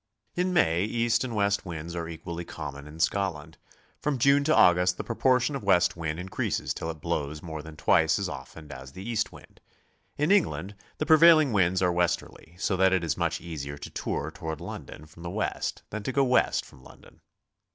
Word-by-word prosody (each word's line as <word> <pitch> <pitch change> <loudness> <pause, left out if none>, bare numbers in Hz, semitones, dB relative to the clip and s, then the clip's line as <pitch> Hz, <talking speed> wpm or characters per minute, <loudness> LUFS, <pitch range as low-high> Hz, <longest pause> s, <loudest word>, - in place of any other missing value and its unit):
In 180 +1 0
May 90 - +3
east 115 +3 +1
and 120 -3 -4
west 100 -1 +1
winds 85 -1 -6
are 85 -1 -4
equally 85 +1 -6
common 70 -3 -7
in 75 +2 -11
Scotland; 85 -3 -1 0.4
from 150 -2 -1
June, 140 +3 +4
to 155 - +3
August 90 +1 +5
the - - -4
proportion 125 +3 +1
of 135 - -4
west 90 -3 +3
wind 80 -1 -3
increases 95 +1 -2
till 80 - -5
it 80 -2 -7
blows 75 +2 -3
more 80 -3 -6
than 80 0 -11
twice - - +3
as - - -2
often 75 -2 -9
as 65 0 -10
the 95 +6 -8
east 115 -2 -1
wind. - - -16 0.6
In 150 +5 +1
England 100 - +2 0.2
the 155 - -1
prevailing 155 -4 +7
winds 95 -1 +2
are 90 - +3
westerly, 85 -1 -2
so 95 +1 0
that 95 0 +4
it 95 -2 +1
is 80 -4 0
much 85 -2 -1
easier 75 -4 -6
to 70 - -9
tour 80 - -3
toward 80 -4 -6
London 75 - -8
from 80 +2 -16
the 85 - -5
west 105 +4 -3
than 110 - -4
to 120 - -3
go 140 +1 +3
west 125 -1 +2
from 65 - -17
London. - - -17
90 Hz, 200 wpm, -27 LUFS, 80-115 Hz, 0.6 s, prevailing